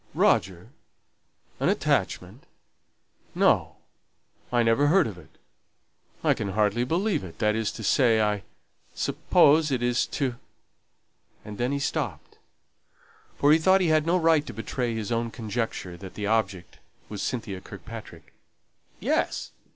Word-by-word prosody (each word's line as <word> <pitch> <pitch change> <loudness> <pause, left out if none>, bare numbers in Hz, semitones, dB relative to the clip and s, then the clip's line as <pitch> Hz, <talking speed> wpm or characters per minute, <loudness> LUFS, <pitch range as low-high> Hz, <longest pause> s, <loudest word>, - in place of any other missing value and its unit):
"Roger! 90 +3 +1 0.9
an - - +2
attachment! - - -1 0.9
No! - - +2 0.8
I 120 -1 +3
never 115 +6 +3
heard 180 +4 +4
of 105 - -5
it 80 - -19 0.9
I - - +4
can 100 -2 -4
hardly 105 +3 +1
believe 175 - 0
it 90 -3 -10
that 105 -1 +1
is 110 -1 -1
to 110 - -8
say, 115 +1 +3
I 105 -1 +1 0.5
suppose 155 +2 +3
it 130 -3 -1
is 120 0 +1
to 130 -4 -2 0.5
" - - -39
And 105 +1 -8
then 125 +2 0
he 140 - 0
stopped; 140 - -4 1.0
for 145 - +4
he 160 - +6
thought 190 +4 +4
he 180 -3 +1
had 155 0 +2
no 175 +2 +3
right 160 -3 +3
to - - -6
betray 120 +1 -3
his 110 +1 -4
own 115 0 0
conjecture 110 -5 -4
that 95 0 -10
the 105 - -4
object 100 -5 -1 0.3
was 105 -2 -6
Cynthia 105 -6 -4
Kirkpatrick. - - -11 0.7
"Yes. - - -1
115 Hz, 145 wpm, -26 LUFS, 105-145 Hz, 1.0 s, he